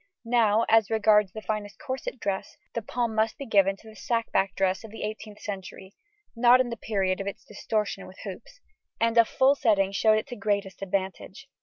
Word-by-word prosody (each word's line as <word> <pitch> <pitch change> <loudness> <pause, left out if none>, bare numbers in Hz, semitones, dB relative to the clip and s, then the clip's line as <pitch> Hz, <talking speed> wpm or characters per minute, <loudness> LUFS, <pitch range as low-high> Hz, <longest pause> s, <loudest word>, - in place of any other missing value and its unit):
Now, 230 -2 +3
as 225 -2 +4
regards 210 -3 +4
the 215 +2 -8
finest 210 +1 -4
corset 265 -3 -5
dress, 195 -2 -3 0.2
the 230 - -2
palm 235 +1 -2
must 220 0 0
be 280 - -6
given 195 -4 +3
to 220 - -17
the 220 - -12
sack 230 +2 -2
back 195 0 +1
dress 190 +2 0
of 225 - -9
the 225 - -8
eighteenth 210 0 -6
century 190 -1 -7 0.4
(not 240 +2 +6
in 250 -2 0
the - - -3
period 195 -4 -1
of 195 - -5
its 200 - -6
distortion 210 -1 -3
with 185 - -14
hoops), 210 - -9 0.4
and 230 0 +2
a 230 - +8
full 265 +4 +3
setting 210 -8 +2
showed 215 +2 +3
it 215 - -2
to 245 - -5
greatest 200 -2 -2
advantage. 195 +6 -4
215 Hz, 200 wpm, -27 LUFS, 195-230 Hz, 0.4 s, a